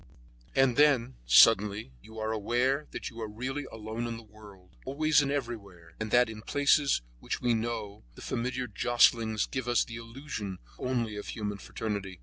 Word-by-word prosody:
And 135 -2 +3
then, 135 -4 +4
suddenly, 105 - +5
you 110 - -13
are 110 0 -2
aware 125 +7 0
that - - -6
you 115 0 -9
are 110 - -3
really 130 +6 -4
alone 110 +2 -5
in 115 -1 -4
the 115 - -11
world, 105 -4 -16
always 150 +2 +3
and 140 -1 -1
everywhere, 100 -11 -5
and 110 0 -3
that 120 +3 +5
in 110 -1 -8
places 140 - +2 0.2
which - - -3
we 120 -1 +2
know, 110 - -3
the - - -11
familiar 125 +2 -2
jostlings 115 -1 +3
give 130 -2 -4
us 120 -1 +3
the 115 - -8
illusion 115 -5 -6 0.2
only 120 -4 -1
of 105 - -6
human 105 -2 -4
fraternity. 100 -5 -5
115 Hz, 170 wpm, -29 LUFS, 105-125 Hz, 0.2 s, suddenly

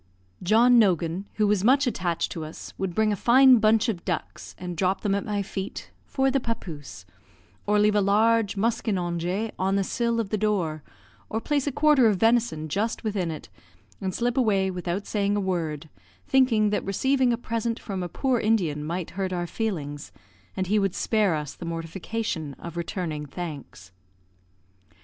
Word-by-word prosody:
John 235 +6 +5
Nogan, 180 -2 +1
who 215 - +2
was 205 -2 +2
much 275 +5 +4
attached 180 -8 -1
to 165 - -5
us, 155 +1 -9
would 190 -3 -2
bring 215 -1 +2
a - - 0
fine 255 +4 +6
bunch 220 +2 +3
of 190 -7 -2
ducks, - - -5
and 180 -1 -6
drop 185 +3 0
them 205 -2 0
at 200 - 0
my 205 -1 -1
feet 195 0 -6 0.2
"for 270 0 +1
the 275 - +2
papouse," 160 - -6 0.6
or 210 0 +3
leave 210 0 +4
a 210 - +3
large 210 +1 +2
muskinonge 195 -2 -1
on 190 +1 +1
the 200 - +2
sill 235 +3 -1
of 215 -4 -3
the 215 - 0
door, 185 -8 0 0.5
or 220 - -1
place 290 +3 -1
a - - +1
quarter 290 -2 +4
of 210 -3 +2
venison 225 -9 +2
just 210 +11 -2
within 200 -6 -1
it, 155 - -7 0.5
and 190 -1 -3
slip 240 +1 -1
away 200 -6 +2
without 180 +2 -3
saying 205 -1 0
a - - +1
word, 165 -5 -2 0.4
thinking 230 -6 +3
that 210 - 0
receiving 260 +6 +1
a 235 - +1
present 230 0 -2
from 195 -4 -5
a 175 - -4
poor 260 +2 0
Indian 180 -10 +1
might 170 +2 -4
hurt 190 +1 -3
our 175 -1 -2
feelings, 150 - -4 0.5
and 190 - 0
he 210 +3 +2
would 195 -2 0
spare 210 -6 +1
us 150 -2 -4
the - - -10
mortification 165 -1 -4
of 170 -1 -9
returning 165 -3 -4
thanks. 140 - -8
200 Hz, 175 wpm, -25 LUFS, 175-225 Hz, 0.6 s, fine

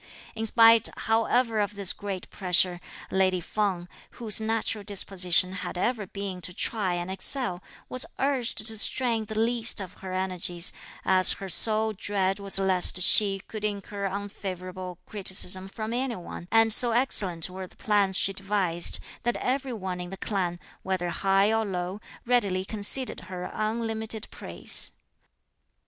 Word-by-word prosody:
In 225 0 -1
spite 225 0 +5
however 225 0 +1
of 205 0 -2
this 200 -3 +4
great 195 -3 -6
pressure, 180 -1 +1 0.3
lady 190 -1 +1
Feng, 185 -1 -3 0.3
whose 220 -3 +3
natural 220 -1 -2
disposition 185 -2 +4
had 185 -1 -6
ever 215 +1 -2
been 195 -2 -7
to 180 +1 -6
try 195 -6 -1
and 175 +1 -5
excel, 190 -1 0 0.3
was 255 - +4
urged 260 -5 0
to 220 -1 -2
strain 230 -1 +1
the 215 +1 -7
least 230 0 +1
of 190 -2 -7
her 190 -1 -7
energies, 185 -2 0 0.3
as 185 -1 +4
her 195 -1 -8
sole 220 +3 +5
dread 195 -1 -2
was 200 -1 +4
lest 185 -2 +3
she 195 0 +4
should 215 -1 -7
incur 205 -1 -4
unfavourable 185 -2 -6
criticism 190 -2 -1
from 215 +3 -6
any 250 0 -2
one; 175 -1 -9
and 225 -1 +4
so 240 +1 +4
excellent 195 -9 +1
were 185 0 -8
the - - -22
plans 200 -3 0
she 195 - 0
devised, 195 -3 0 0.2
that 240 0 -2
every 265 +1 -2
one 185 -4 -5
in 175 - -7
the 195 - -8
clan, 180 -4 -3 0.2
whether 185 -2 -3
high 195 +3 +1
or 225 0 +1
low, 185 0 -5 0.2
readily 200 -7 0
conceded 220 +5 +2
her 180 -1 -6
unlimited 220 0 -2
praise. - - +2
200 Hz, 150 wpm, -26 LUFS, 185-220 Hz, 0.3 s, spite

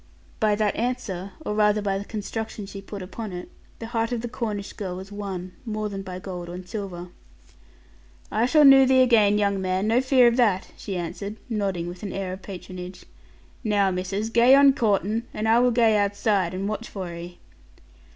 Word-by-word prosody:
By 215 -1 +3
that 210 -1 0
answer, 215 -6 -3
or - - -1
rather 210 0 +3
by 195 -1 -1
the 200 - -7
construction 220 0 -5
she 195 0 -8
put 195 0 -7
upon 205 +3 -6
it, 180 0 -7 0.3
the 230 - -7
heart 230 0 -1
of 240 -2 -1
the 240 - -4
Cornish 215 -4 -4
girl 190 -4 -5
was 190 +2 -9
won, 190 -3 -5
more 215 -3 -3
than 195 -1 -5
by 185 -2 -7
gold 180 -2 -7
and 180 +1 -8
silver. 180 -3 -6 1.2
'I 220 +2 +2
shall 300 +2 +5
knoo 270 -1 +8
thee 260 0 +6
again, 215 -5 +4
young 200 -2 +1
man; 185 +1 0
no 230 +3 +3
fear 260 -1 +5
of 235 +1 +2
that,' 210 -7 +2
she 195 -3 -5
answered, 200 +4 -5
nodding 195 -6 -1
with 175 +1 -8
an 200 -3 -5
air 190 -2 -3
of 190 - -8
patronage. 185 -1 -9 0.6
'Now, 205 -3 +2
missis, 190 +4 -2
gae 240 +3 +6
on 280 0 +7
coortin', 220 -2 0
and 215 +1 -1
I 225 +2 +5
wall 250 0 +4
gae 230 -2 +3
outside 200 -3 +1
and 195 +2 -2
watch 215 +2 -4
for 185 -4 -6
'ee.' 175 +1 -8
205 Hz, 195 wpm, -25 LUFS, 185-225 Hz, 1.2 s, knoo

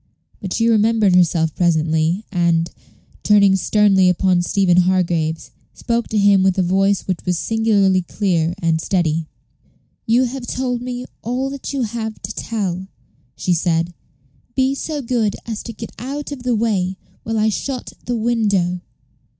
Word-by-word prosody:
But 190 -2 -4
she 230 0 +2
remembered 220 -3 +3
herself 165 -3 +3
presently, 160 +2 +1
and, 170 -2 +1 0.5
turning 200 -2 +5
sternly 195 -1 +3
upon 180 0 +2
Stephen 180 0 +2
Hargraves, 175 -3 +1 0.2
spoke 235 -1 -1
to 220 - -2
him 200 -1 +5
with 190 0 +2
a 190 - +3
voice 195 +2 +2
which 185 -3 -3
was 180 -1 0
singularly 205 -3 +2
clear 175 -3 -1
and 160 -1 +1
steady. 165 -4 0 0.8
"You 235 +3 +4
have 255 0 -4
told 250 -2 -2
me 250 0 -5 0.2
all 255 +3 -2
that 280 -1 -6
you 275 -3 -1
have 220 -1 -4
to - - -4
tell," 190 -5 -3 0.5
she 180 - 0
said; 170 0 0 0.6
"be 265 0 +2
so 290 +1 -4
good 230 -4 0
as 225 -2 -4
to 235 - -7
get 225 +1 -8
out 280 +4 -5
of 280 -3 -6
the 245 -1 0
way 195 -4 0 0.2
while 225 0 -3
I 215 0 +3
shut 255 +4 -4
the 245 - -1
window." 205 -6 0
200 Hz, 155 wpm, -19 LUFS, 180-230 Hz, 0.8 s, turning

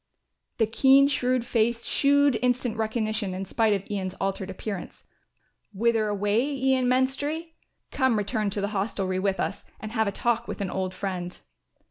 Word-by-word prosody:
The 225 - +3
keen 270 +5 +5
shrewd 255 -3 +1
face 230 0 0
shewed 285 -3 +3
instant 250 -2 +1
recognition 215 -3 -1
in 190 +1 -4
spite 220 +2 +1
of 200 -1 -2
Ian's 190 -3 -3
altered 195 0 -2
appearance. 195 0 -6 0.7
"Whither 225 +1 +2
away, 205 +2 +1
Ian 265 -2 +1
Menstrie? 285 +6 0 0.4
Come 260 -5 +2
return 210 0 0
to 200 +1 -3
the 200 - -1
hostelry 195 -2 -1
with 195 0 0
us - - -2 0.2
and 215 - -7
have 220 -2 +1
a - - 0
talk 235 +2 0
with - - -5
an 195 -2 -3
old 185 -1 -3
friend." 180 -2 -4
220 Hz, 160 wpm, -26 LUFS, 200-250 Hz, 0.7 s, keen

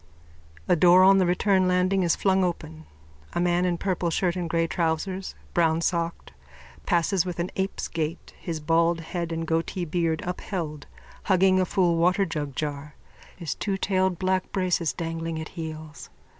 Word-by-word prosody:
A - - +4
door 180 +2 +6
on 195 +1 +6
the 185 - +3
return 185 +1 +2
landing 185 +1 +2
is 170 -2 +2
flung 190 -1 +2
open. 80 - -4 0.5
A - - -1
man 175 0 +2
in 175 -1 0
purple 180 -2 -1
shirt 175 +2 0
and 175 -2 -3
grey 165 0 +1
trousers, 175 +3 -2 0.2
brownsocked, 170 0 0 0.6
passes 175 +1 +2
with 180 -2 -5
an 175 +1 -2
ape's 190 +1 -2
gait, 165 0 -4
his 165 -3 -4
bald 165 +2 +2
head 170 +1 -4
and 165 0 -2
goatee 165 +2 -1
beard 165 -1 -1
upheld, 170 -4 -4 0.4
hugging 185 0 +4
a 185 - +2
full 180 -4 +2
waterjugjar, 150 -5 -1 0.4
his 170 -4 -3
twotailed 190 -2 0
black 185 0 -1
braces 180 -4 0
dangling 165 -1 -4
at 160 - -6
heels. 155 -2 -8
175 Hz, 150 wpm, -26 LUFS, 165-185 Hz, 0.6 s, door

